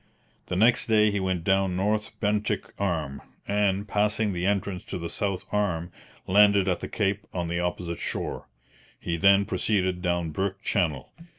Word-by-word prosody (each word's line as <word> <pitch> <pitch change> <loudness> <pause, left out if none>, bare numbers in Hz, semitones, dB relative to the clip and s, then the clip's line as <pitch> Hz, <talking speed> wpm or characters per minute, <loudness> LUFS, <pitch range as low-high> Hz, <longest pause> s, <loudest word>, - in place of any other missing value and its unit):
The - - -2
next 115 +6 +4
day 105 -1 +4
he 100 - -1
went 95 -3 -1
down 95 -1 +2
North 105 +3 -1
Bentinck 105 0 -1
Arm, 80 -8 -2 0.3
and, 100 0 +1
passing 105 0 +1
the 90 +1 -1
entrance 100 -2 -1
to - - -5
the 85 -1 -5
south 100 -3 -2
arm, 90 -5 -1 0.3
landed 100 0 +5
at 90 - +1
the - - -5
cape 100 -1 -1
on 85 -2 -2
the 85 +1 -1
opposite 90 -1 -3
shore. - - -4 0.5
He 85 - -2
then 100 +3 +5
proceeded 95 -4 0
down 85 -2 -1
Burke 95 +5 -3
Channel. 80 - -1
95 Hz, 165 wpm, -26 LUFS, 90-105 Hz, 0.5 s, landed